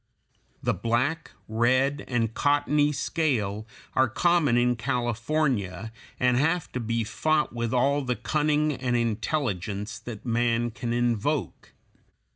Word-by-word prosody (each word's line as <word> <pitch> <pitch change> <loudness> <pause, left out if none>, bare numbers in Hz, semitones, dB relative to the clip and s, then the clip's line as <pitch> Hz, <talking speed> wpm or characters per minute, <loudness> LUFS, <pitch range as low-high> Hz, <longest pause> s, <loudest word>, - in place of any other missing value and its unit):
The - - +2
black, 130 +8 -1 0.2
red, 130 +5 +1
and 115 -3 0
cottony 145 +1 +2
scale 115 -9 -1 0.3
are 130 -1 +3
common 160 -2 +3
in 125 0 +3
California, 120 - -1 0.3
and 125 -1 +3
have 165 +5 +1
to 125 - -3
be 115 0 -1
fought 150 +9 0
with 115 -1 -2
all 140 +3 +2
the 125 -2 -1
cunning 150 +1 +1
and 125 -2 -1
intelligence 110 - -2
that 115 -1 -9
man 120 0 +1
can 120 +1 -4
invoke. 120 +4 -1
120 Hz, 120 wpm, -26 LUFS, 115-145 Hz, 0.3 s, are